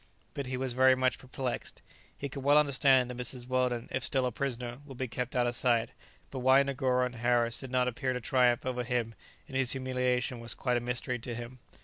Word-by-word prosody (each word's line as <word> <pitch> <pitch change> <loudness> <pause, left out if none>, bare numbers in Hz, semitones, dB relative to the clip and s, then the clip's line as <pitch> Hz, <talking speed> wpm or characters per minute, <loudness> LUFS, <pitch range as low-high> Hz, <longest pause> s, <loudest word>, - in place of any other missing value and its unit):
But 140 -2 -4
he 130 0 -2
was 130 -1 -1
very 130 +1 +5
much 130 -2 0
perplexed. 130 -1 -5 0.3
He 140 - -4
could 140 0 -7
well 145 +2 +5
understand 135 -3 +4
that 125 - -8
Mrs. 125 0 -4
Weldon, 125 -2 0
if 130 - -2
still 130 -2 +1
a 125 - 0
prisoner, 120 -1 -4
would 135 -3 -11
be 130 - -2
kept 125 +2 -4
out 125 -1 +3
of 120 - 0
sight, 120 -2 +1 0.4
but 135 - -4
why 130 +2 +5
Negoro 130 -2 +1
and 125 -1 -6
Harris 120 0 +1
did 135 - -7
not 125 0 +1
appear 125 +1 -1
to 125 - -2
triumph 125 -1 +2
over 125 -1 -2
him 120 -2 -1 0.3
in - - -15
his 130 -2 +4
humiliation 125 -1 -1
was 115 0 -3
quite 125 -2 0
a - - +1
mystery 125 +1 -1
to 120 0 -5
him. 120 +2 -8
125 Hz, 225 wpm, -30 LUFS, 120-130 Hz, 0.4 s, very